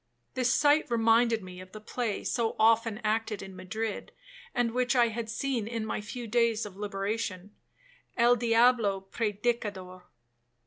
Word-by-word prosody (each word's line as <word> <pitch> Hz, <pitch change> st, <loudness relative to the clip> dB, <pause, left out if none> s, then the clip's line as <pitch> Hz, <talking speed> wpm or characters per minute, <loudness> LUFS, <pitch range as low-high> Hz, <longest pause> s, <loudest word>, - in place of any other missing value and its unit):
This 255 Hz, -1 st, +1 dB
sight 290 Hz, +3 st, +3 dB
reminded 230 Hz, -1 st, +3 dB
me 180 Hz, 0 st, -9 dB
of 185 Hz, 0 st, -14 dB
the 215 Hz, -, -8 dB
play 220 Hz, 0 st, -3 dB
so 230 Hz, -2 st, -1 dB
often 225 Hz, 0 st, +3 dB
acted 215 Hz, -1 st, -1 dB
in 190 Hz, -1 st, -10 dB
Madrid, 210 Hz, +4 st, -4 dB, 0.4 s
and 240 Hz, -1 st, 0 dB
which 250 Hz, +1 st, 0 dB
I 240 Hz, -2 st, +4 dB
had 225 Hz, 0 st, -5 dB
seen 235 Hz, -2 st, -2 dB
in 230 Hz, -1 st, -3 dB
my 215 Hz, -, -3 dB
few 235 Hz, +3 st, -7 dB
days 230 Hz, -1 st, +1 dB
of 200 Hz, -3 st, -9 dB
liberation,—El 210 Hz, -, -2 dB
diablo 230 Hz, -3 st, +3 dB
Predicador. 205 Hz, -4 st, -2 dB
225 Hz, 140 wpm, -29 LUFS, 205-240 Hz, 0.4 s, I